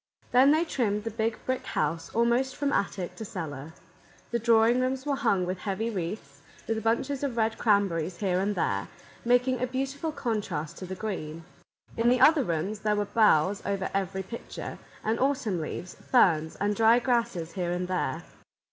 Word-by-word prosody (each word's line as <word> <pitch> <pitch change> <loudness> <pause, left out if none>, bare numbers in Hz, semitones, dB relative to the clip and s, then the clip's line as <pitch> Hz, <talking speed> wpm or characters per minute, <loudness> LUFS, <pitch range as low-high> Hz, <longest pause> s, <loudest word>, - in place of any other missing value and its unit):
Then 255 +3 +6
they 315 +3 +4
trimmed 210 -9 -1
the 225 - -3
Big 220 0 -1
Brick 260 0 -1
House 165 +2 -2
almost 240 +3 +2
from 285 0 -1
attic 190 -2 -1
to 225 - -5
cellar. 160 -6 -6 0.6
The 235 - 0
drawing 230 +1 +4
rooms 260 +1 -1
were 285 -1 +1
hung 215 -9 +1
with 185 +1 -3
heavy 215 +4 -2
wreaths, 185 +1 -5 0.3
with 220 -1 -1
bunches 260 +5 0
of 260 -4 -2
red 220 0 0
cranberries 190 -5 +1
here 185 -2 0
and 200 +2 0
there, - - -1 0.4
making 245 +1 +2
a 255 - +1
beautiful 270 +5 -3
contrast 210 - -3
to 185 - -6
the 190 - -5
green. 165 -6 -5 0.5
In 230 +1 +3
the 250 +1 +3
other 305 +2 +6
rooms 185 +3 -2
there 210 0 +1
were 205 0 0
boughs 200 -3 +3
over 195 -1 -2
every 190 0 -1
picture, 230 +5 -7 0.2
and 220 +2 0
autumn 255 - 0
leaves, 175 +3 -5
ferns, 160 -10 +2
and 205 +1 0
dried 230 +2 +5
grasses 235 -10 0
here 175 0 -2
and 180 +1 -2
there. 185 0 -2
215 Hz, 175 wpm, -28 LUFS, 185-245 Hz, 0.6 s, Then